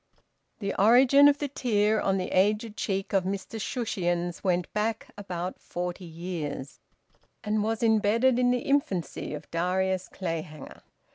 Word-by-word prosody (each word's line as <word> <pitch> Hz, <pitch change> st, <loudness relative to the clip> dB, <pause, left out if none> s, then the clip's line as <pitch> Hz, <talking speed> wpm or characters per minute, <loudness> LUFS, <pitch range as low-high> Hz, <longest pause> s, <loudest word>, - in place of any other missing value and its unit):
The 200 Hz, -2 st, -3 dB
origin 260 Hz, +6 st, +7 dB
of 290 Hz, 0 st, +4 dB
the 290 Hz, -, -2 dB
tear 220 Hz, -6 st, +1 dB
on 195 Hz, 0 st, +1 dB
the 185 Hz, -, -3 dB
aged 210 Hz, +3 st, +1 dB
cheek 195 Hz, -2 st, -3 dB
of 195 Hz, -2 st, +3 dB
Mr 195 Hz, +3 st, -4 dB
Shushions 175 Hz, -8 st, -2 dB
went 180 Hz, -2 st, 0 dB
back 220 Hz, +1 st, -2 dB
about 185 Hz, -3 st, -5 dB
forty 180 Hz, +1 st, -5 dB
years, 165 Hz, -5 st, -6 dB, 0.6 s
and 215 Hz, 0 st, 0 dB
was 225 Hz, +1 st, -1 dB
embedded 230 Hz, +3 st, +3 dB
in 250 Hz, 0 st, +3 dB
the 245 Hz, 0 st, +1 dB
infancy 200 Hz, -, -1 dB
of 150 Hz, -, -11 dB
Darius 185 Hz, +2 st, 0 dB
Clayhanger. 165 Hz, -5 st, -6 dB
195 Hz, 140 wpm, -27 LUFS, 180-225 Hz, 0.6 s, origin